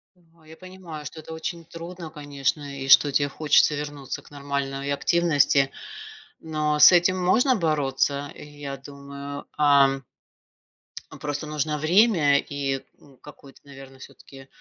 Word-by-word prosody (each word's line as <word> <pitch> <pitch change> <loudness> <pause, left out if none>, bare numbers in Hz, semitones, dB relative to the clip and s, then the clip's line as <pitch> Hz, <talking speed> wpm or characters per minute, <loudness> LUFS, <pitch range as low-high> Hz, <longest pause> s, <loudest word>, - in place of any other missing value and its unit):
Да, 165 -2 -27
я 160 +1 -14
понимаю, 185 -5 -10
что 160 +3 -8
это 160 - -10
очень 165 +1 -6
трудно, 170 +1 -9
конечно, 145 -1 -4
и 135 - -5
что 145 +1 +6
те 145 0 +1
хочется 150 +1 +3
вернуться 145 -2 -6
к - - -19
нормальной 140 -1 -4
активности, 145 -3 +2 0.7
но 155 -1 -1
с 150 - +9
этим 180 +1 +3
можно 245 +9 +3
бороться, 145 -4 -1
я 145 -2 -8
думаю. 140 +1 -9
Ам 140 -2 +4 1.2
просто 145 0 -4
нужно 150 0 -2
время 160 -3 +3
и 140 -2 -4 0.2
н 135 -3 -20
какое-то, 145 -2 -15
наверно, 135 -1 -13
всё-таки, 135 0 -14
145 Hz, 130 wpm, -24 LUFS, 140-160 Hz, 1.2 s, с